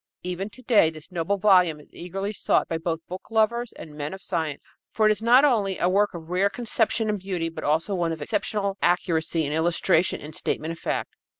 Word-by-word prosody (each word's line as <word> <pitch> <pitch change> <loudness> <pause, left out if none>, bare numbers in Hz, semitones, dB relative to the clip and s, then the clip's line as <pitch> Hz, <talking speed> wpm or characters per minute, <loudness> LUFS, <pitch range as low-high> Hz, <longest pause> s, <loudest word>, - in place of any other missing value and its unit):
Even 180 +3 -3
to 255 +4 -14
day 215 -9 +5
this 155 +2 -12
noble 180 +3 -1
volume 180 -6 +4
is 150 - -19
eagerly 195 +4 -4
sought - - +1
by 165 - -2
both 165 0 -3
book 185 +1 -8
lovers 225 +2 +1
and 155 - -11
men 150 +3 -5
of 190 - -13
science, 160 -5 -3 0.2
for 220 - +1
it - - +5
is 215 - -1
not 245 +5 +6
only 205 -8 +1
a - - +1
work 200 +1 +2
of 165 0 -9
rare 190 +3 +2
conception 225 +1 0
and 210 -1 -1
beauty 180 -3 -2
but 165 - -8
also 160 +7 +1
one 170 -3 0
of 160 - -4
exceptional 200 +6 -2
accuracy 165 -2 +1
in 145 - -2
illustration 170 +2 +2
and 150 +2 -9
statement 155 +1 -2
of 165 - -8
fact. - - -3
180 Hz, 215 wpm, -25 LUFS, 165-205 Hz, 0.2 s, not